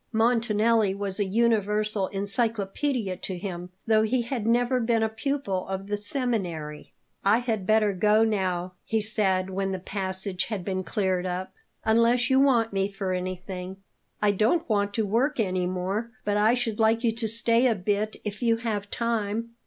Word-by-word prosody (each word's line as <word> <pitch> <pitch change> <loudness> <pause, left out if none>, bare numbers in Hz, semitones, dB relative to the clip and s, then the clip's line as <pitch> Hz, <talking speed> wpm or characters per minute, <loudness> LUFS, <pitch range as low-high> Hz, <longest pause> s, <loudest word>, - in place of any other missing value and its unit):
Montanelli 225 -2 +2
was 200 0 -3
a 205 - +2
universal 210 -1 +1
encyclopaedia 205 +2 -1
to 185 0 -5
him, 180 -1 -6 0.2
though 220 -1 +4
he 235 +3 +1
had 235 -2 -3
never 245 +2 +2
been 230 -1 +1
a 220 - +1
pupil 220 -5 -2
of 190 0 -4
the 205 +1 -2
seminary. 200 - -3 0.3
"I 205 +3 +5
had 225 -6 -2
better 215 -2 +3
go 210 +4 +4
now," 185 -4 -1
he 220 - 0
said 195 -3 0
when 195 0 -1
the - - -2
passage 190 0 -3
had 205 -6 -4
been 185 -1 -2
cleared 185 -1 -1
up; 180 +1 -4 0.3
"unless 235 +3 +3
you 265 - +5
want 240 -6 +3
me 195 0 0
for 195 -2 -3
anything." 185 0 -5 0.5
"I 205 - +5
don't 220 - +1
want 205 -2 +1
to 220 - +1
work 250 +8 +1
any 185 -4 0
more, 190 +5 -2 0.2
but 205 - +1
I 215 +3 +4
should 230 -3 -2
like 225 +2 +3
you 230 - +3
to 225 0 -2
stay 230 +2 +3
a 230 - +2
bit 205 +3 -1
if 210 +2 -5
you 230 -1 +3
have 215 -3 -3
time." 230 0 -2
210 Hz, 175 wpm, -26 LUFS, 190-230 Hz, 0.5 s, I